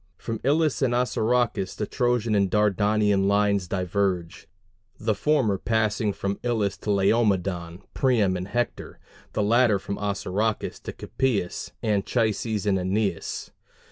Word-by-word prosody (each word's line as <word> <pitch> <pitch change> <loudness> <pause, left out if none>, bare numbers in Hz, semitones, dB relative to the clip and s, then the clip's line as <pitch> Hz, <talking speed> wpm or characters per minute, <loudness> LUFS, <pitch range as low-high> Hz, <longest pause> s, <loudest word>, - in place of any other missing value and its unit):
From 115 -1 -5
Ilus 150 +2 +2
and 125 -3 +2
Assaracus 120 -4 0
the 105 - -2
Trojan 120 -2 0
and 100 -2 +2
Dardanian 105 -1 +2
lines 100 -2 +2
diverge; 90 -2 -2 0.5
the 110 0 +1
former 110 -4 +1
passing 110 -1 0
from 100 0 -3
Ilus 110 -5 0
to - - -7
Laomedon, 95 -4 +1
Priam, 110 -8 +2
and 90 +1 -4
Hector; 120 +3 -3 0.4
the 105 - 0
latter 115 0 +4
from 100 +1 -5
Assaracus 105 +1 -2
to - - -7
Capys, 115 -10 -2
Anchises, 110 0 0
and 95 -2 +2
Æneas. 95 -1 -2
105 Hz, 125 wpm, -25 LUFS, 100-115 Hz, 0.5 s, latter